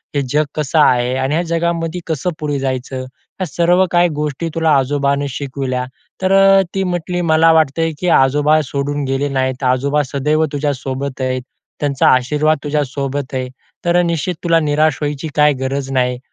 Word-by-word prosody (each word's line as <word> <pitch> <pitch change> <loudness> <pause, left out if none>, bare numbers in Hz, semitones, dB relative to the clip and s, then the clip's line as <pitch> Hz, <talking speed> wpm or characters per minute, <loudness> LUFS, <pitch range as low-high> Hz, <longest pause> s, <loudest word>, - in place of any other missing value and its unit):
हे 140 - +2
जग 150 +3 +2
कसं 155 +1 0
आहे 125 -3 +3
आणि 130 +2 -1
ह्या 170 - +1
जगामध्ये 170 0 -1
कसं 160 +1 -1
पुढे 150 -2 -2
जायचं 130 -1 -3
ह्या 130 +8 -8
सर्व 175 +5 +2
काही 175 0 +3
गोष्टी 150 +2 -2
तुला 160 -1 +2
आजोबांनी 140 +1 0
शिकवल्या. 130 -2 -3 0.4
तर 185 0 +1
अ, 195 0 +6
ती 195 - +1
म्हटली 180 -1 -2
मला 165 -1 +4
वाटतंय, 160 +1 +2
की 180 - -2
आजोबा 150 +1 +3
सोडून 145 +1 -2
गेले 140 +2 0
नाही, 130 -1 0
आजोबा 135 +3 +1
सदैव 150 +3 +1
तुझ्या 145 0 0
सोबत 135 0 -5
आहेत. 130 0 -1 0.4
त्यांचा 140 -2 +1
आशीर्वाद 150 +5 +1
तुझ्या 150 0 0
सोबत 140 0 -4
आहे. 130 -1 -3 0.4
तर 175 0 +2
निश्चित 170 +1 -1
तुला 165 -1 +3
निराश 150 -1 +1
व्हायची 145 +1 -3
काही 150 0 +4
गरज 135 +1 -3
नाही. 125 -1 0
145 Hz, 170 wpm, -17 LUFS, 135-165 Hz, 0.4 s, अ